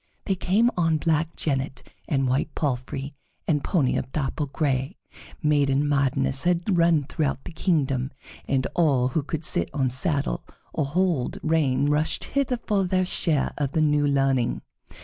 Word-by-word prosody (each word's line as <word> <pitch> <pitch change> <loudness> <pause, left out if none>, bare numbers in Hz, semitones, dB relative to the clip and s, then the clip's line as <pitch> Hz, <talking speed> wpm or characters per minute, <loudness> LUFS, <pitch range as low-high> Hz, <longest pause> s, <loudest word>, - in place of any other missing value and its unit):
They 195 - +1
came 205 +6 +2
on 165 -3 +2
black 160 +1 0
jennet 135 -2 -2 0.2
and 135 -2 +1
white 135 +4 -1
palfrey 135 0 -3 0.3
and 150 -3 +1
pony 150 -9 +1
of 130 - -4
dapple 145 0 -2
gray; 135 +2 -1 0.5
maiden 145 -1 +2
madness 140 -1 +1
had 175 +2 +1
run 165 -3 +4
throughout 140 -1 -2
the - - -8
kingdom, 135 -7 0 0.4
and 130 -1 +1
all 140 -7 +3
who 155 +5 0
could 155 +2 -4
sit 85 - +3
on 130 -3 +1
saddle 140 +2 -1 0.3
or 155 - 0
hold 165 -3 0
rein 145 -4 +2
rushed 150 +2 +1
hither 275 -3 0
for 205 -4 0
their 185 0 +1
share 160 -5 0
of 140 -2 -1
the 160 - +2
new 150 -1 +3
learning. 135 -3 +1
145 Hz, 155 wpm, -25 LUFS, 135-165 Hz, 0.5 s, run